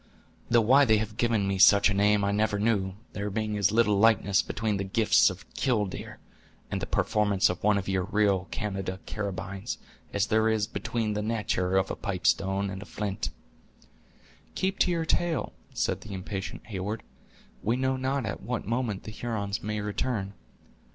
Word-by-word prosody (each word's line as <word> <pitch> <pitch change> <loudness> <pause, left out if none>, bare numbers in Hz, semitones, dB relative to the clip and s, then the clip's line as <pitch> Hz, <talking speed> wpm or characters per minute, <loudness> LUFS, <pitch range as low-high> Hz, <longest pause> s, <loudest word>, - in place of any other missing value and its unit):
Though 120 0 +5
why 130 +6 +6
they 110 -3 +4
have 105 0 -3
given 115 -5 +1
me 95 -1 -1
such 100 +1 +7
a 100 - +1
name 105 +1 +3
I 100 - +1
never 105 0 +1
knew, 100 -3 0 0.2
there 100 0 -3
being 105 +1 -2
as 100 -1 +2
little 105 -3 +3
likeness 100 -3 +4
between 105 -2 -2
the 100 - -2
gifts 105 +3 +4
of 95 +2 -9
'killdeer' 105 -8 -1 0.5
and - - -2
the - - -3
performance 105 -3 +2
of 90 - -7
one 105 0 +4
of 95 - -3
your 95 -2 0
real 100 -2 +1
Canada 95 -3 -3
carabynes, 100 -2 -4 0.3
as 100 -1 +1
there 110 +1 +2
is 110 -2 +1
between 110 0 -2
the 105 - -1
natur' 105 -4 0
of 95 0 +1
a - - -2
pipe 100 -4 -4
stone 95 0 +2
and 95 0 -6
a - - -8
flint." 105 -1 -3 1.3
"Keep 190 +1 -1
to - - +4
your 170 -2 0
tale," 170 -2 0 0.2
said - - -1
the 100 - -7
impatient 95 +1 -5
Heyward; 105 +1 -4 0.6
"we 115 +3 +1
know 130 +1 +1
not 130 0 -1
at 110 - -4
what 125 -2 -3
moment 115 -2 -2
the 110 - -7
Hurons 105 -3 -3
may 105 0 -3
return." 105 -1 -2
105 Hz, 180 wpm, -28 LUFS, 100-110 Hz, 1.3 s, such